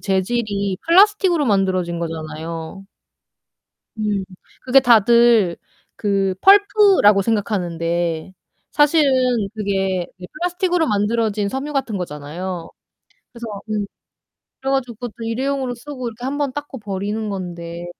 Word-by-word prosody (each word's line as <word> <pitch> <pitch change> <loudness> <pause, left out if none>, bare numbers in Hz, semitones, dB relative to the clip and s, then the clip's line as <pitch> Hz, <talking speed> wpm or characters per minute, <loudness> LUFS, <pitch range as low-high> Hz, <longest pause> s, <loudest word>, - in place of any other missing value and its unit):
재질이 200 0 -1
플라스틱으로 370 -3 +4
만들어진 185 -4 +1
거잖아요. 165 +2 -6 1.1
음. 210 -2 -1 0.4
그게 260 +1 +5
다들 235 -5 +5 0.4
그 195 -2 0
펄프라고 395 - +5
생각하는데 175 -6 -1 0.4
사실은 295 -1 +4 0.4
그게 195 -4 -1
그 180 - -11
플라스틱으로 355 +1 0
만들어진 210 -1 0
섬유 270 +7 -4
같은 265 -7 -2
거잖아요. 170 +2 -6 0.6
그래서 235 -1 -9 0.2
음 210 -1 -1 0.8
그래 270 - -2
가지고 255 -3 -1
그것도 235 -1 -8
일회용으로 260 +2 -2
쓰고 255 0 -6
이렇게 230 +2 -9
1 270 +2 -2
번 285 -3 -1
닦고 290 -1 -6
버리는 205 +2 -3
건데 175 -3 -6
210 Hz, 285 characters per minute, -20 LUFS, 185-265 Hz, 1.1 s, 그게